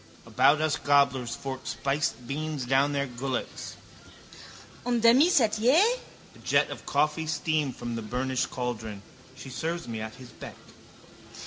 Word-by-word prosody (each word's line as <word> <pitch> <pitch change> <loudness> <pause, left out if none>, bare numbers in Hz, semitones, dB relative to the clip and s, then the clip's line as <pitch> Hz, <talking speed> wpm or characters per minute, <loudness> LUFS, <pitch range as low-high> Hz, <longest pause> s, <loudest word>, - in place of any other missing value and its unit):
About 150 +2 +4
us 155 -2 +1
gobblers 140 -4 +2
fork 135 -2 -6
spiced 135 -4 -1
beans 150 -1 -3
down 135 +3 +3
their 140 -1 0
gullets. 130 0 -5 1.1
Un 245 -1 +1
demi 235 +7 +6
sétier! 240 0 +4 0.5
A - - -17
jet - - +2
of - - -9
coffee 155 +1 +1
steam 155 -2 0
from 120 -1 -5
the 115 - -3
burnished 130 +3 -1
caldron. 110 -5 -5 0.3
She 135 - -10
serves 165 +6 -3
me 115 -2 -4
at 110 +1 -6
his 125 -1 -12
beck. - - -10
140 Hz, 140 wpm, -27 LUFS, 125-155 Hz, 1.1 s, demi